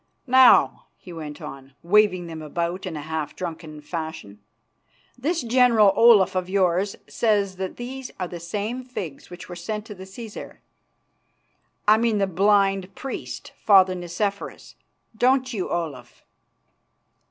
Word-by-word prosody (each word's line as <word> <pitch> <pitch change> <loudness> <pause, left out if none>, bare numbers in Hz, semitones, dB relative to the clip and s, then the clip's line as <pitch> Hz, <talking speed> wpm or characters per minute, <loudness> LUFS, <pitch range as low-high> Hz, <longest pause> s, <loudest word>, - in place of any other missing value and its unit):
"Now," 260 -1 +5
he 180 - -12
went 155 0 -8
on, 135 -2 -10
waving 185 -1 +3
them 160 -1 -7
about 170 +4 -3
in 165 -4 -5
a 145 - -6
half 155 -1 -4
drunken 160 -3 -7
fashion, 155 - -7 0.8
"this 310 +6 -2
General 230 -4 +4
Olaf 225 -5 +6
of 185 0 -2
yours 190 0 +1
says 205 -4 0
that 190 -1 -5
these 255 +2 -6
are 180 - -2
the 175 0 -8
same 210 +8 -4
figs 185 - -7
which 175 0 -10
were 175 - -8
sent 210 +5 -5
to 220 - -8
the 190 -1 -11
Cæsar, 210 +3 -9 1.3
I 215 +1 +7
mean 225 -1 +1
the 200 - +2
blind 195 0 +2
priest, 270 - -7
Father 190 -3 +6
Nicephorus. 185 +3 -4 0.4
Don't 255 +2 +2
you, 195 -5 -3
Olaf?" 155 -8 -5
190 Hz, 140 wpm, -24 LUFS, 170-220 Hz, 1.3 s, I